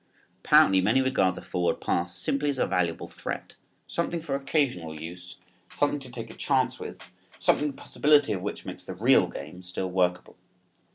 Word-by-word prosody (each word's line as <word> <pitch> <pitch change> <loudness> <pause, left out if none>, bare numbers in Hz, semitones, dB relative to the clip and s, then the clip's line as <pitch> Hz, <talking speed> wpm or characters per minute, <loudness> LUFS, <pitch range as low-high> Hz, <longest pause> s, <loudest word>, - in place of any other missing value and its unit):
Apparently 95 -1 +6
many 110 +8 +3
regard 130 -9 +2
the - - -9
forward 90 -1 -1
pass 85 +1 -1
simply 140 +10 0
as 140 - -1
a - - +2
valuable 85 -2 -1
threat, - - -6 0.3
something 170 0 -2
for 165 -3 -4
occasional 135 - -1
use, 90 +3 -9 0.3
something 145 0 0
to 130 -2 -11
take 115 -2 -7
a - - -12
chance 130 -2 +1
with, - - -8 0.3
something 150 - +2
the 145 - -4
possibility 145 -1 +3
of 95 - -3
which 100 - -5
makes - - -7
the - - -7
real - - +4
game 90 - -8
still 90 0 -4
workable. 90 -1 0
100 Hz, 175 wpm, -27 LUFS, 90-140 Hz, 0.3 s, Apparently